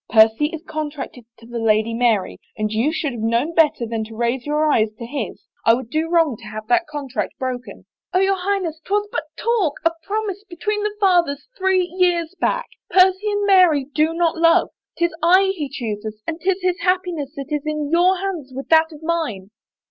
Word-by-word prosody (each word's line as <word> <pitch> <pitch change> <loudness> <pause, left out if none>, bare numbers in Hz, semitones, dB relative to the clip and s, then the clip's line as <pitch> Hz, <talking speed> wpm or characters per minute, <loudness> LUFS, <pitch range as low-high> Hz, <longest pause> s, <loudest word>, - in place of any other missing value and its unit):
Percy 225 +5 +5
is 320 +1 -7
contracted 295 -5 -5
to 230 - -16
the 235 0 -5
Lady 220 0 +2
Mary 230 -5 +1 0.2
and 215 -1 -1
you 235 +8 +1
should 310 -3 -2
have 235 -3 -6
known 235 +8 0
better 305 -7 +3
than 225 -1 -3
to 220 +1 -11
raise 240 +3 -1
your 300 +1 +1
eyes 225 -8 +3
to 235 - -7
his. 245 -2 -5 0.2
I 230 - +5
would 240 -2 -7
do 320 +1 0
wrong 325 -8 +2
to 230 - -14
have 215 0 -7
that 355 -1 +3
contract 285 -4 -4
broken." 255 -1 -5
" - - -73
Oh, 365 - +4
your 385 +1 +3
Highness, 360 -4 -2
'twas 415 +1 0
but - - -2
a - - -8
talk, 440 -11 +2
a 330 - +5
promise, 405 +1 -3
be 365 -4 -11
tween 420 +4 -1
the 420 0 -3
fathers 345 -8 +2
three 380 -2 +2
years 350 -2 0
back. - - 0 0.2
Percy 380 +2 +4
and 410 0 0
Mary 360 -8 +5
do 315 +2 +2
not 340 -1 +1
love. 330 0 +4 0.3
'Tis 340 -1 +1
I 375 +4 +5
he 295 -6 -4
chooses 215 -4 -5
and 330 +1 -4
'tis 385 0 0
his 365 0 +1
happiness 360 -6 -1
that 280 +1 -7
is 295 - -2
in 305 -1 -2
your 360 +3 +4
hands 360 -8 -4
with 270 - -6
that 320 0 +5
of 305 0 -12
mine." 295 - -2
315 Hz, 210 wpm, -21 LUFS, 245-365 Hz, 0.3 s, Percy